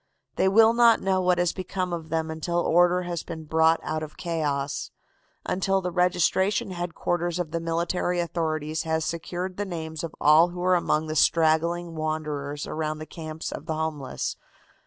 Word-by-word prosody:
They - - +2
will 220 +3 +6
not 235 -1 +5
know 190 -1 +1
what 180 -1 +2
has 175 -1 +1
become 185 -1 -3
of 165 -2 -5
them 160 0 -1
until 160 +2 -2
order 175 +1 +3
has 175 -2 -3
been 160 -1 -7
brought 160 +1 +3
out 155 0 -2
of 155 -1 -8
chaos; 145 -5 -2 0.6
until 195 +1 +1
the 180 -1 -3
registration 185 +3 +1
headquarters 175 -1 -2
of 175 -3 -3
the 170 - -1
military 170 +2 -1
authorities 160 -2 -2
has 160 -1 -1
secured 175 +3 -4
the 205 - -1
names 160 -4 -5
of 165 - -5
all 155 +3 +6
who 175 0 -6
are 185 0 +4
among 160 -3 +1
the 155 0 -4
straggling 165 +2 +2
wanderers 150 -2 -3
around 155 -1 -3
the 155 - -7
camps 160 -1 -6
of 155 - -7
the 160 - -1
homeless. 155 -4 -3
165 Hz, 175 wpm, -26 LUFS, 155-180 Hz, 0.6 s, will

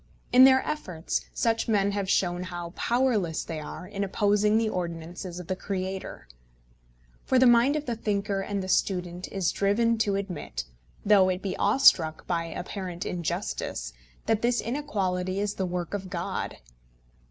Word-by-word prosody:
In 255 +1 +9
their 265 0 +5
efforts 180 - -3
such 230 -1 0
men 200 -3 +2
have 200 -1 -2
shown 175 -2 +1
how 175 -2 -6
powerless 230 -10 +1
they 160 - -5
are 155 +4 -7
in 200 0 -3
opposing 210 +2 +2
the 225 0 +2
ordinances 175 -1 -5
of 180 - -7
the 185 - -2
Creator. 190 - -5 1.0
For 260 - +2
the 255 - +6
mind 240 +4 +5
of 300 -1 -2
the 240 - -2
thinker 200 -2 -1
and 200 0 -3
the - - -5
student 180 -2 0
is 190 -4 0
driven 225 +3 +2
to 205 -2 +1
admit, 180 - -4 0.4
though 200 -2 +6
it 185 0 -2
be 195 - -2
awestruck 185 - +4
by 170 -1 -1
apparent 180 +1 -5
injustice, - - -3 0.3
that 225 -1 +1
this 240 0 +2
inequality 195 -8 -2
is 205 0 -1
the 190 - -2
work 175 0 -4
of 195 -2 -4
God. - - -3
195 Hz, 160 wpm, -27 LUFS, 180-220 Hz, 1.0 s, In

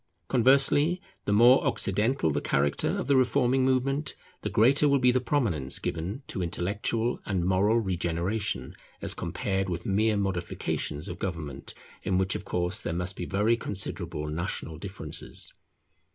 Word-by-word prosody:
Conversely, 140 +7 +4 0.3
the - - 0
more 120 +5 +6
occidental 105 - +1
the - - -1
character 70 0 +1
of - - -2
the 140 +1 +3
reforming 130 0 +3
movement, 135 +3 0 0.3
the - - -3
greater 135 +7 +4
will 140 - +4
be 125 -2 +4
the 130 - +2
prominence 105 - 0
given 95 - -4
to 95 - -4
intellectual 105 +7 -1
and 95 -4 -1
moral 95 +5 +3
regeneration 90 - -2 0.2
as - - -3
compared 95 0 -2
with 85 -1 -4
mere 105 +2 +2
modifications 90 -4 -2
of 85 -2 -6
government, 80 -8 -5 0.3
in 95 - 0
which 95 0 +2
of - - -5
course 90 +1 -1
there 85 - -3
must 90 +3 -2
be - - -4
very 105 +4 +2
considerable 95 -8 -3
national 80 0 -3
differences. 95 -5 -4
100 Hz, 150 wpm, -28 LUFS, 85-125 Hz, 0.3 s, more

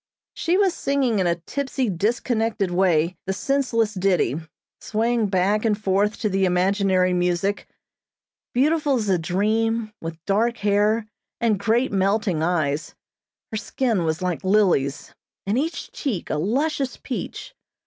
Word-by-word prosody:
She 350 +2 +1
was 390 -3 +3
singing 270 -6 0
in 185 - +2
a 170 - +2
tipsy, 265 - -3
disconnected 220 +1 0
way 175 -2 +2
the 190 - 0
senseless 230 -2 0
ditty, 185 - +1 0.4
swaying 225 0 0
back 195 +2 +1
and 215 -3 +2
forth 205 +1 +1
to 215 - +1
the 195 -1 0
imaginary 185 0 +2
music. 180 +3 0 0.8
Beautiful 295 +2 +2
as 215 -5 -1
a 185 -2 +3
dream, 215 +5 0
with 165 0 -5
dark 230 +4 +1
hair, 210 +2 +2 0.3
and 220 -4 +1
great 225 +5 +1
melting 195 -3 +1
eyes, 160 -3 -1 0.6
her 220 - -2
skin 225 -3 -1
was 160 +2 -1
like 180 0 -2
lilies, 185 -9 +1 0.3
and 200 +2 0
each 320 +4 -3
cheek 235 - -3
a - - 0
luscious 270 - -1
peach. - - -6
205 Hz, 140 wpm, -23 LUFS, 180-230 Hz, 0.8 s, was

